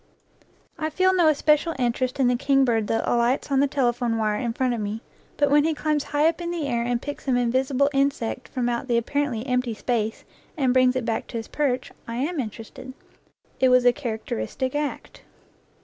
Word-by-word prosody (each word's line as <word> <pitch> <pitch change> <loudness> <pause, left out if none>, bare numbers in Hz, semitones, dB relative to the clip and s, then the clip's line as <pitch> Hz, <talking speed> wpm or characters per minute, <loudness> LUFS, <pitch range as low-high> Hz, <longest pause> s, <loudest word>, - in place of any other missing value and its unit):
I 310 0 -1
feel 370 +4 +2
no 350 -3 +4
especial 305 +2 +2
interest 255 +1 -1
in 260 - +4
the 245 - +3
kingbird 250 -4 +2
that 225 - -1
alights 240 +4 +1
on 270 - +3
the 285 - +4
telephone 245 -4 0
wire 215 -1 0
in 235 - -1
front 250 +1 0
of 235 - -3
me, 210 +2 -4 0.3
but 290 -1 +2
when 295 0 +5
he 320 0 0
climbs 300 -1 -1
high 295 +2 +2
up 330 +1 -1
in 340 - -3
the 340 -3 -2
air 240 -3 0
and 240 0 0
picks 290 +3 -7
some 260 -3 +2
invisible 260 +3 +1
insect 275 -3 -1
from 250 -2 -2
out 240 +2 -2
the 240 -2 +2
apparently 245 -1 -1
empty 250 -3 -1
space, 225 -1 -2 0.3
and 260 -4 +2
brings 255 0 +4
it 255 -2 -1
back 225 -2 -2
to 235 - -5
his 225 - -5
perch, 260 -4 -1 0.2
I 230 - -5
am 295 +6 -2
inter 225 -2 -4
ested. 260 +4 -11 0.7
It 260 - +4
was 250 0 +4
a 245 - +6
characteristic 235 - -4
act. 295 0 -4
255 Hz, 205 wpm, -24 LUFS, 235-285 Hz, 0.7 s, a